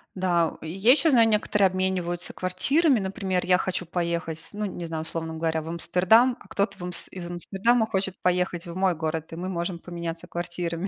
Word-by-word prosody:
Да, 175 -3 +2
у, - - -8
и 160 - -5
я 195 +8 +4
ещё 310 +4 +4
знаю: 235 -5 +6
некоторые 210 -2 +3
обмениваются 185 -2 -1
квартирами. 265 - +2
Например, 190 -1 -1
я 180 0 +5
хочу 185 -1 -2
поехать, 170 -2 -3
ну, 210 +1 -4
не 180 -3 -5
знаю, 160 -1 -4
условно 160 0 -4
говоря, 160 0 -1
в 155 - -10
Амстердам, 185 +9 +3
а - - -17
кто-то 200 -1 -1
в - - -13
Амс 180 -1 -5
из 180 -2 -6
Амстердама 200 +7 +1
хочет 190 -3 -2
поехать 180 -1 0
в 170 -1 -7
мой 185 -1 +2
город, 160 0 -3
и - - -4
мы 180 +2 -4
можем 170 -1 -3
поменяться 170 -1 -6
квартирами. 175 +1 -3
180 Hz, 200 wpm, -26 LUFS, 170-195 Hz, -, знаю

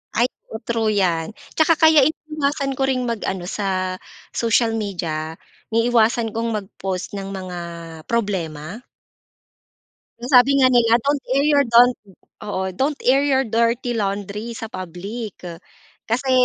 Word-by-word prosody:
Ay, 235 - +4 0.2
o 220 - -5
true 230 -2 0
'yan. 175 -6 +1 0.2
Tsaka 320 0 +3
kaya 315 -2 +6
iniiwasan 295 -2 -1
ko 270 - -6
ring 255 -1 0
mag-ano 200 -6 -3
sa 185 -1 -2 0.4
social 230 0 +2
media, 165 -7 -3 0.3
iniiwasan 230 -1 +2
kong 230 +1 -1
mag-post 190 -2 -5
ng 195 -1 -5
mga 185 -2 -6 0.5
problema? 190 -4 -2 1.4
Ang 240 - -6
sabi 275 +3 +6
nga 260 - +6
nila, 240 -2 +4
don't 280 +3 0
air 275 +2 +3
your, 290 -2 +4
don't, 240 0 +5 0.5
oo. 205 -2 -3
Don't 280 +6 0
air 270 +2 +5
your 270 -3 +2
dirty 235 +2 +1
laundry 205 +1 -3
sa 225 -1 -6
public. 200 +3 -7 0.7
Kasi 255 +4 0
230 Hz, 130 wpm, -21 LUFS, 195-255 Hz, 1.4 s, kaya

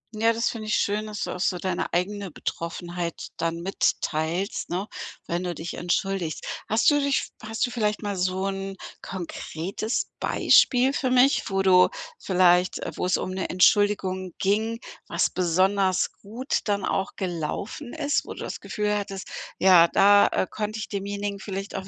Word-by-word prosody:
Ja, 225 +2 +3
das 230 +1 0
finde 215 -2 -7
ich 215 - +1
schön, 210 +1 0
dass 210 -1 -4
du - - -3
auch 180 - -5
so 185 0 +1
deine 180 0 -2
eigene 195 +3 -1
Betroffenheit 170 +1 -5
dann 165 0 -2
mitteilst, 175 0 -1
ne, 190 +4 -2 0.4
wenn 175 +2 -2
du 175 -1 -3
dich 165 +2 -6
entschuldigst. 175 -2 -2 0.2
Hast 220 +7 +4
du 290 - +3
dich 280 -1 0
hast 225 0 -1
du 245 - -6
vielleicht 210 -2 -1
mal 205 -1 -2
so 185 +1 -1
'n 195 0 -3 0.3
konkretes 190 +3 -4
Beispiel 255 +2 +4
für 260 -2 0
mich, 255 +2 +4
wo 195 0 0
du 185 -1 +6 0.3
vielleicht, 180 -1 +3
äh - - -5
wo - - -1
es 185 - +2
um 185 - -3
'ne 190 0 -3
Entschuldigung 185 -1 +2
ging, 220 +4 0 0.3
was - - +1
besonders 185 +2 +2
gut 235 +7 -2
dann 200 -2 0
auch 195 +1 -1
gelaufen 190 - -4
ist, 295 -2 0
wo - - -8
du - - -8
das - - -5
Gefühl 210 -1 -1
hattest: 195 -2 -4 0.3
„Ja, 180 -3 +7
da, 205 +2 +6
äh, - - 0
konnte 215 0 -4
ich 220 - -5
demjenigen 200 0 -3
vielleicht 195 0 -5
auch 190 -1 -5
195 Hz, 170 wpm, -25 LUFS, 180-210 Hz, 0.4 s, Ja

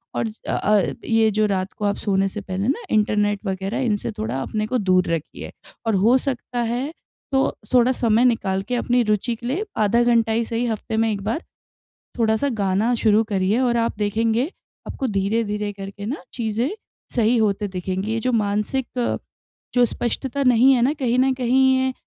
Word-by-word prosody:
और - - 0
ज 215 - -7
अ - - -1
अ, 205 -3 +2
ये 225 -1 +3
जो 215 +1 +2
रात 195 -2 -1
को 210 - -4
आप 205 0 +1
सोने 195 -1 +1
से 205 +2 -5
पहले 195 +1 -3
ना 260 -2 0
इंटरनेट 210 -1 +2
वगैरह, 190 +1 -2
इनसे 225 -5 -1
थोड़ा 120 +5 -2
अपने 215 +10 -2
को 255 - 0
दूर 185 -4 +2
रखिए। 165 -2 -4 0.4
और 220 - +2
हो 245 +3 +6
सकता 250 -2 -3
है, 245 +6 -2 0.4
तो 270 0 +1 0.2
थोड़ा 250 0 +5
समय 235 -1 +2
निकाल 195 -6 +1
के - - +2
अपनी 245 0 +2
रुचि 220 +3 0
के 240 +1 -8
लिए 340 - -1
आधा 220 +3 +3
घंटा 230 -2 +3
ही 230 +1 +1
सही 230 +2 -2
हफ़्ते 220 0 -3
में 225 0 +2
1 200 -2 -3
बार 225 - -1 0.8
थोड़ा-सा 225 +5 +2
गाना 200 +5 +1
शुरू 215 0 +4
करिए, 205 +1 0
और 245 -2 +2
आप 230 -2 0
देखेंगे, 225 +5 0 0.4
आपको 265 - -3
धीरे-धीरे 210 0 -1
करके 200 +1 -8
ना 260 +8 -4
चीज़ें 230 +2 -1 0.5
सही 235 0 +3
होते 210 -1 +1
दिखेंगी। 190 +2 -3
ये 225 - 0
जो 255 +3 0
मानसिक 230 +3 -1 0.6
जो 245 -1 +5
स्पष्टता 255 +4 -2
नहीं 250 +1 +5
है 245 - +2
ना, 260 +5 +3
कहीं 255 -5 0
न 265 +1 +3
कहीं 260 +1 +3
ये 260 0 0
225 Hz, 190 wpm, -22 LUFS, 205-245 Hz, 0.8 s, हो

